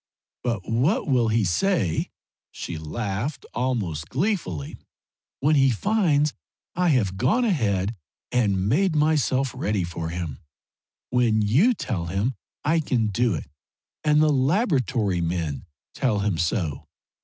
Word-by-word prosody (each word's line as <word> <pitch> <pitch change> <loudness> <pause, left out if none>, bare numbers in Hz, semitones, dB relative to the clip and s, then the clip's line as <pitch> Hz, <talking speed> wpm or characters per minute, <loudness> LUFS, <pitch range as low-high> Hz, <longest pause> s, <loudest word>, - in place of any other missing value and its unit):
But 115 -7 -2
what 140 - +1
will 125 -5 +3
he 110 0 +2
say," 95 - +1 0.4
she 85 -2 -6
laughed, 105 - -4
almost 105 -12 -2
gleefully 130 - -2 0.6
"when 150 +3 +3
he 135 -2 +5
finds 150 - +2 0.4
I 180 0 +2
have 105 - +1
gone 220 - +2
ahead 110 - 0 0.4
and 100 -6 +1
made 175 - +2
myself 145 -4 +2
ready 105 -3 -1
for 85 -1 -4
him? 85 -5 -5 0.7
When 115 -3 +3
you 155 - +4
tell 85 - -3
him 100 +9 0 0.3
I 160 +3 +2
can 120 -8 0
do 115 +1 +1
it 75 - -5 0.6
and 150 -1 +4
the 155 -1 +4
laboratory 130 - +1
men 85 -4 -2 0.3
tell 110 -6 0
him 100 -5 0
so? 80 -3 -1
120 Hz, 130 wpm, -24 LUFS, 95-145 Hz, 0.7 s, he